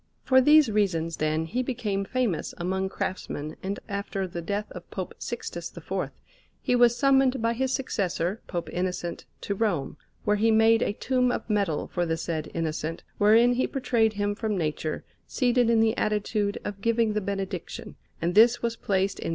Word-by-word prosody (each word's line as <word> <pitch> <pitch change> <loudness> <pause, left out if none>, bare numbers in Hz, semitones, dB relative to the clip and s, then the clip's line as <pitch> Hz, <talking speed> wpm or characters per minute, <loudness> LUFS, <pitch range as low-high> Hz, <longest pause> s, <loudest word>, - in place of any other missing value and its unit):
For 260 0 +5
these 295 -2 +6
reasons, 170 -6 0
then, 155 +1 0
he 240 +10 -1
became 215 -6 -2
famous 235 -6 -1
among 190 +2 -1
craftsmen, 155 -5 -4
and 195 +2 -3
after 200 -2 -3
the 175 -1 -5
death 205 +4 -2
of - - -10
Pope - - -5
Sixtus - - -6
IV - - -3 0.5
he 250 - +1
was 240 -1 +5
summoned 270 -1 +4
by 230 +1 +1
his 260 +2 -1
successor, 195 -7 -1
Pope 175 -2 -3
Innocent, 180 -1 -3 0.2
to 200 - -2
Rome, 190 -10 -1 0.3
where 210 0 +2
he 225 +2 +3
made 225 +1 +5
a - - +1
tomb 250 +2 +1
of - - -3
metal 200 -8 0
for 175 -1 -1
the 165 0 0
said 160 -2 -3
Innocent, 165 0 -3 0.2
wherein 225 +4 +6
he 250 - +1
portrayed 235 -5 +1
him 205 0 -1
from 215 -1 -2
nature, 155 -1 -2 0.2
seated 245 -2 +2
in 230 -1 +4
the 225 0 +3
attitude 210 -1 0
of 200 -1 -5
giving 230 -1 +2
the 210 - 0
Benediction; 195 -2 -5 0.2
and 170 +2 0
this 230 +4 +5
was 230 -1 0
placed 195 -2 0
in - - -4
S. - - -1
205 Hz, 180 wpm, -27 LUFS, 180-235 Hz, 0.5 s, these